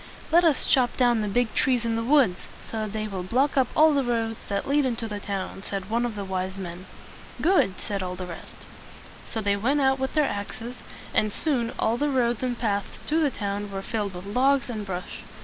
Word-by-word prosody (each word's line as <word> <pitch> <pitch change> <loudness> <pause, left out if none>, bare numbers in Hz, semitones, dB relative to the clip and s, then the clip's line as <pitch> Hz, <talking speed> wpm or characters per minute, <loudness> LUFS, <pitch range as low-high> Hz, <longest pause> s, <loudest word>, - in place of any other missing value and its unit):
"Let 345 +2 +6
us 320 -5 +3
chop 250 -3 +3
down 240 -3 +3
the 210 - -1
big 240 +3 +1
trees 250 -3 +2
in 230 -1 0
the 230 - -1
woods, 250 -8 +4 0.2
so 225 - -6
that 215 -1 -3
they 215 0 -2
will 195 -3 -4
block 255 +10 +1
up 265 -3 +4
all 310 0 +6
the 280 -1 +2
roads 225 -2 -1
that 200 0 -2
lead 290 +1 +3
into 235 -3 -1
the 210 -1 -4
town," 195 -1 -4
said 195 0 -4
one 240 +1 +2
of 225 - -6
the 200 -1 -4
wise 190 0 -3
men. 180 0 -7 0.5
"Good!" 315 - +3
said 200 -2 -2
all 180 0 -3
the 185 0 -5
rest. 170 -2 -10 0.6
So 225 - -3
they 200 -1 +2
went 255 +9 +1
out 265 -1 +3
with 265 +3 -2
their 305 -1 +4
axes, 225 +4 -5 0.4
and 215 - +2
soon 245 -3 0
all 230 +2 +1
the 295 +3 +1
roads 240 -4 +1
and 250 -2 -1
paths 205 -4 -2
to 315 +2 +2
the 305 -3 +3
town 205 -3 -3
were 195 0 -5
filled 205 -4 -2
with 180 +1 -7
logs 260 +5 +2
and 215 -3 -5
brush. 180 -1 -5
225 Hz, 225 wpm, -26 LUFS, 200-260 Hz, 0.6 s, Let